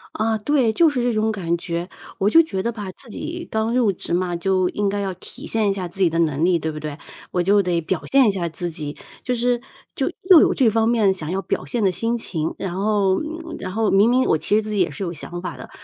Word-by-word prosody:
啊， 220 0 +1
对， 250 0 +2
就 325 +7 +4
是 250 -4 -1
这 245 - +1
种 215 0 +1
感 175 -6 -1
觉。 170 +1 -4 0.3
我 195 - +3
就 330 - +7
觉 195 -13 -3
得 235 - 0
吧， 205 -4 -6
自 245 - -12
己 335 +9 -6
刚 220 +2 0
入 240 -5 +3
职 175 - -6
嘛， 180 0 0
就 185 +1 +1
应 205 -1 -1
该 200 +1 -1
要 195 -1 -2
体 - - -9
现 220 -2 +1
一 - - +2
下 185 -3 -4
自 195 - -6
己 180 - +5
的 165 - -2
能 155 -1 +1
力， 180 -1 +3
对 160 -1 -3
不 150 - -7
对？ 150 -1 -6 0.3
我 180 -1 +1
就 200 +2 +4
得 175 -2 0
表 170 +2 -2
现 270 -1 +5
一 - - +3
下 180 -3 -2
自 175 +2 -4
己， 150 -3 -5 0.3
就 250 - 0
是 245 0 +1 0.3
就 - - -1 0.2
又 360 -4 +10
有 - - +4
这 255 -5 +3
方 225 +1 +2
面 220 -5 +3
想 160 -5 -6
要 190 +2 -1
表 - - -3
现 235 -4 -2
的 190 - +3
心 230 +6 -1
情， 160 -8 -3
然 185 -3 -4
后 200 -3 +2
嗯， 325 +1 -6
然 185 - -5
后 220 +1 +1
明 200 +4 +5
明 255 +1 +3
我 160 - +2
其 205 - 0
实 220 - +4
自 215 - -6
己 210 -1 -1
也 175 -3 +3
是 145 +7 -6
有 170 - -3
想 175 +2 -7
法 180 - -6
的， - - -10
200 Hz, 290 characters per minute, -22 LUFS, 175-230 Hz, 0.3 s, 又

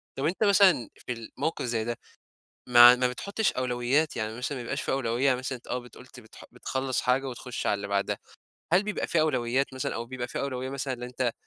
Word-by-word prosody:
طب 135 - -2
أنت 180 +7 0
مثلًا 190 - +5 0.2
في 125 - -2
الموقف 115 +7 -4
زي 115 -2 -1
ده، 120 +1 -3 0.7
ما 120 0 +9
ما 125 0 +1
بتحُطّش 200 - -1
أولويات؟ 130 +4 0
يعني 110 +1 -3
مثلًا 135 +3 -3
ما - - -5
يبقاش 140 +4 -3
في - - -2
أولوية 125 -1 0
يعني 130 -2 +4
مثلًا 130 0 -4
آه، 125 - -1
بت 125 0 -14
قُلت 125 0 -13
بتح 110 -2 -14
بتخلّص 130 +1 -2
حاجة 130 +2 +1
وتخُش 125 0 -5
على - - +3
اللي 100 0 -3
بعدها. 100 0 0 0.6
هل 180 +3 +5
بيبقى 210 0 -3
في 170 - +2
أولويات 130 -3 0
مثلًا، 130 - -3
أو 115 - -3
بيبقى 125 -1 -5
في - - -5
أولوية 130 -1 -3
مثلًا 135 -1 -3
إن 120 - -11
أنت 125 -1 -2
125 Hz, 215 wpm, -27 LUFS, 120-135 Hz, 0.7 s, ما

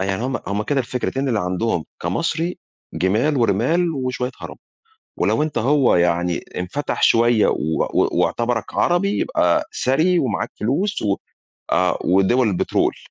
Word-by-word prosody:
آه، - - 0
يعني 95 +2 -2
هُم 130 - -1
هُم 100 +1 -1
كده 140 +5 0
الفكرتين 130 +2 -2
اللي 110 -4 +1
عندهم 90 -1 -1 0.2
كمصري: 165 +1 -2 0.4
جِمال 110 +11 +1
ورِمال 125 - +2
وشوية 130 -2 -2
عرب، - - -8 0.6
ولو 150 - +1
أنت 155 -4 -3
هو 135 +1 +3
يعني 85 0 +1 0.2
انفتح 90 +12 -3
شوية 115 -1 +4
و 80 +1 0
و - - +3
واعتبرك 120 -1 -1
عربي 200 +4 +1
يبقى 85 -1 +1
ثري 160 +8 +3
ومعاك 130 - -2
فلوس 160 - -1
و 100 -2 +1 0.6
آه 90 +1 +2
ودُوَل 95 +7 +3
البترول. 95 - 0
120 Hz, 140 wpm, -20 LUFS, 95-145 Hz, 0.6 s, شوية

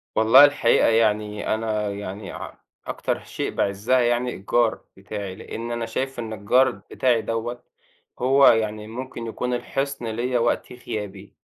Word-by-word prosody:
والله 115 +6 +8
الحقيقة 145 -5 +3
يعني 105 -2 +1
أنا 110 -1 -1
يعني 100 0 -6
ع - - -8 0.3
أكتر - - -2
شيء - - -4
باعِزّها 100 +6 +1
يعني 120 +1 +1
الجار 115 +4 +1 0.2
بتاعي، 100 -1 -6
لإن 115 +2 -6
أنا 120 -1 -2
شايف 130 +3 -3
إن 110 -2 -4
الجار 125 +6 +3
بتاعي 120 -3 0
دوّة 115 +2 -4 0.6
هو 135 +2 +5
يعني 110 -2 +2
ممكن 120 0 -6
يكون 125 +2 -3
الحِصن 135 +1 -3
ليّا 120 +3 -1
وقت 120 +1 0
غيابي. 105 -5 -7
115 Hz, 140 wpm, -23 LUFS, 105-125 Hz, 0.6 s, والله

